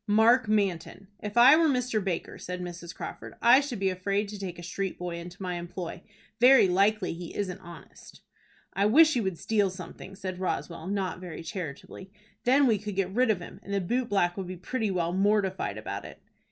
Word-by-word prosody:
"Mark 225 +3 +5
Manton." 195 -2 -1
"If 210 +2 -5
I 255 +5 +9
were 325 0 +4
Mr. 250 -6 0
Baker," 185 -3 -3
said 180 0 -5
Mrs. 175 -1 -7
Crawford, - - -8
"I 240 +3 +7
should 280 -4 -4
be 195 -1 +1
afraid 200 +3 -1
to 210 -1 -7
take 180 -3 -5
a 175 - -9
street 190 +2 -4
boy 175 -1 -4
into 175 +2 -9
my 180 -1 -3
employ. 175 0 -6 0.4
Very 250 -3 +7
likely 195 +2 +2
he 170 0 -8
isn't 185 -3 -3
honest." 170 -1 -13 0.5
"I 200 +1 +2
wish 310 +7 +6
he 245 - +1
would 190 -4 -2
steal 205 0 +1
something," 185 +1 -9
said 185 -2 -6
Roswell, 170 -2 -3
not 190 -3 -2
very 175 -3 -8
charitably. 185 0 -7 0.4
"Then 270 +3 +5
we 225 -5 +3
could 210 -1 -6
get 190 -1 -1
rid 250 +2 +3
of 200 -5 +1
him, - - -10
and 200 - -4
the - - +2
boot 240 +7 -1
black 175 -3 +1
would 190 -2 -4
be 185 0 -6
pretty 220 +5 -2
well 175 -2 -1
mortified 195 0 +1
about - - -5
it." - - -11
195 Hz, 205 wpm, -28 LUFS, 180-215 Hz, 0.5 s, I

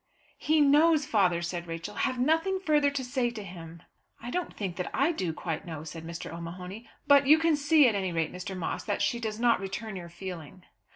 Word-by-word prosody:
"He 310 0 +3
knows, 300 +1 +5
father," 180 -7 +2
said 175 0 -4
Rachel. 165 +5 -6
"Have 255 - -1
nothing 325 +9 +1
further 300 -5 +3
to 280 -2 -3
say 250 -1 0
to 225 -3 -7
him." 170 -2 -10 0.4
"I 240 - -7
don't 360 +3 -2
think 190 -4 -4
that 180 - -3
I 280 +5 +3
do 185 - -2
quite 160 -1 -4
know," 160 -3 -6
said 160 +1 -8
Mr. 170 -1 -6
O'Mahony. 180 +6 -8 0.2
"But 280 -1 +5
you 305 +2 +8
can 325 -1 +3
see, 295 0 +5
at 230 - +2
any 190 -2 -1
rate, 165 -2 -1
Mr. 185 +1 -6
Moss, 175 - -3
that 205 - -1
she 235 - 0
does 220 -2 -4
not 235 -3 +3
return 195 +2 -5
your 175 -2 -7
feeling." 175 -1 -8
205 Hz, 215 wpm, -28 LUFS, 175-280 Hz, 0.4 s, you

